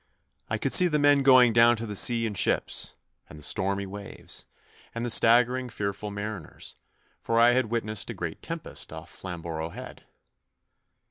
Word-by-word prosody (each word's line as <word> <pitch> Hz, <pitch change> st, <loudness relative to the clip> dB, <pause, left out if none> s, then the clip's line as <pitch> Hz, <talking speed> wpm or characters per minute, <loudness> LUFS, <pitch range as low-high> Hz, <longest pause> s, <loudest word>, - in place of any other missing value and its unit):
I -, -, -1 dB
could -, -, 0 dB
see 180 Hz, -, +8 dB
the 150 Hz, -3 st, 0 dB
men 145 Hz, -1 st, +4 dB
going 130 Hz, -3 st, +6 dB
down 115 Hz, +1 st, +5 dB
to 115 Hz, -, -5 dB
the 105 Hz, -2 st, -6 dB
sea 115 Hz, +3 st, +4 dB
in 110 Hz, -, -3 dB
ships, 100 Hz, -, 0 dB, 0.3 s
and 75 Hz, -, -12 dB
the 75 Hz, -, -10 dB
stormy 100 Hz, +4 st, -1 dB
waves, 100 Hz, +1 st, -9 dB, 0.5 s
and 115 Hz, +1 st, -3 dB
the 120 Hz, -, -1 dB
staggering, 125 Hz, +3 st, +3 dB
fearful 100 Hz, -1 st, -4 dB
mariners, 100 Hz, -4 st, -7 dB, 0.5 s
for 115 Hz, 0 st, 0 dB
I 120 Hz, +1 st, +5 dB
had 130 Hz, 0 st, +2 dB
witnessed 110 Hz, -2 st, -2 dB
a -, -, -5 dB
great -, -, -6 dB
tempest -, -, -5 dB
off -, -, -10 dB
Flamborough 85 Hz, -3 st, -6 dB
Head. -, -, -11 dB
115 Hz, 170 wpm, -26 LUFS, 100-120 Hz, 0.5 s, see